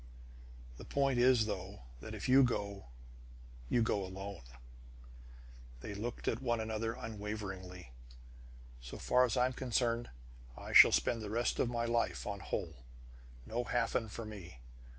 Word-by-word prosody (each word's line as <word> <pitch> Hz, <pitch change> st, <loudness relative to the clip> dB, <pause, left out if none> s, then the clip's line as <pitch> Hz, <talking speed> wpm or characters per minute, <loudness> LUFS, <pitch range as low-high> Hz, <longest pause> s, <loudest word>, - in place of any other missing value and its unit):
"The -, -, -9 dB
point 135 Hz, -3 st, +1 dB
is, 125 Hz, -2 st, +5 dB
though, 100 Hz, -, -5 dB, 0.2 s
that -, -, -7 dB
if -, -, -5 dB
you 130 Hz, +2 st, +7 dB
go, 100 Hz, -6 st, -1 dB, 0.8 s
you 120 Hz, -, +3 dB
go 100 Hz, -3 st, 0 dB
alone!" 95 Hz, 0 st, -7 dB, 1.4 s
They 105 Hz, -, -6 dB
looked 115 Hz, +4 st, -5 dB
at -, -, 0 dB
one 120 Hz, -3 st, 0 dB
another 110 Hz, +1 st, -2 dB
unwaveringly. 100 Hz, -, -6 dB, 0.9 s
"So -, -, -8 dB
far 125 Hz, 0 st, +3 dB
as 120 Hz, -2 st, -1 dB
I'm 125 Hz, +1 st, +2 dB
concerned, 120 Hz, -2 st, 0 dB, 0.5 s
I -, -, -7 dB
shall -, -, +10 dB
spend 115 Hz, -, +1 dB
the 105 Hz, -, -5 dB
rest 120 Hz, +3 st, 0 dB
of 120 Hz, -, +2 dB
my 120 Hz, -1 st, -1 dB
life 115 Hz, 0 st, 0 dB
on 100 Hz, -1 st, -4 dB
Holl! 60 Hz, -7 st, -5 dB, 0.6 s
No 120 Hz, +2 st, -2 dB
Hafen 115 Hz, -2 st, 0 dB
for 115 Hz, +2 st, -6 dB
mine! 100 Hz, -5 st, -9 dB
110 Hz, 145 wpm, -34 LUFS, 100-120 Hz, 1.4 s, shall